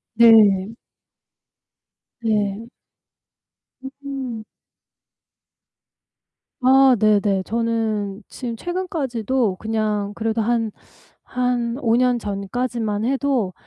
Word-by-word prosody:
네. 215 -3 +6 1.5
네. 215 -1 -1 1.1
음. 265 -4 -7 2.2
아 265 0 +6
네네. 205 -2 +2
저는 220 -3 -2
지금 240 -2 -6
최근까지도 265 - -2
그냥 215 -2 -2
그래도 225 0 -1
한, 225 0 0 0.5
한 245 -1 -1
5 230 -5 +2
년 250 -1 +2
전까지만 210 +1 -3
해도 260 -6 0
230 Hz, 125 characters per minute, -21 LUFS, 210-250 Hz, 2.2 s, 네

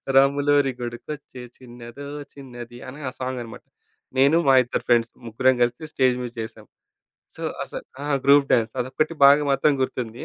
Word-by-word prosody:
రాములోరి 140 0 +4
గుడికొచ్చే 125 +2 -7 0.2
చిన్నదో 120 +2 -11 0.3
చిన్నది 120 -3 -10
అని 135 +3 -9
ఆ - - -9
సాంగనమాట. 125 -3 -5 0.5
నేను 140 +5 +5
మా 135 - +6
ఇద్దరు 120 - -4
ఫ్రెండ్స్ 115 -1 +3
ముగ్గురం 130 +3 +2
కలిసి 120 +5 -2
స్టేజ్ 130 -2 +2
మీద 120 - -5
చేసాం. 110 - -9 0.7
సో, - - -9 0.2
అసలు - - -8 0.2
ఆ! - - -4 0.2
గ్రూప్ 140 0 +6
డాన్స్ 115 -2 +2
అదొక్కటి 145 +6 -2
బాగా 145 +2 +6
మాత్రం 135 +2 +3
గుర్తుంది. 120 -3 -4
130 Hz, 145 wpm, -23 LUFS, 120-140 Hz, 0.7 s, మా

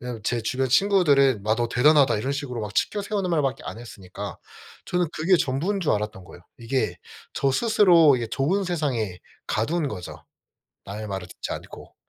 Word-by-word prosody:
왜냐하면 120 -3 -6
제 120 +2 0
주변 130 +4 -1
친구들은 140 - +3
"마 110 +1 +1
너 120 0 -1
대단하다." 135 0 +4
이런 130 +7 -2
식으로 140 -4 -4
막 105 -1 -6
치켜세우는 200 -2 -1
말밖에 145 -5 0
안 - - -6
했으니까 100 -3 -8 0.5
저는 180 -1 0
그게 175 +4 +3
전부인 165 +8 -1
줄 165 - +1
알았던 105 -3 -3
거예요. 90 - -14 0.2
이게 125 +3 -1 0.4
저 135 - +1
스스로 170 - +5
이게 120 -2 -3
좋은 175 - 0
세상에 130 - -2 0.3
가둔 150 +8 -1
거죠. 90 -9 -7 0.7
남의 105 +2 -6
말을 95 -3 -5
듣지 - - -7
않고. - - -10
135 Hz, 370 characters per minute, -24 LUFS, 110-165 Hz, 0.7 s, 스스로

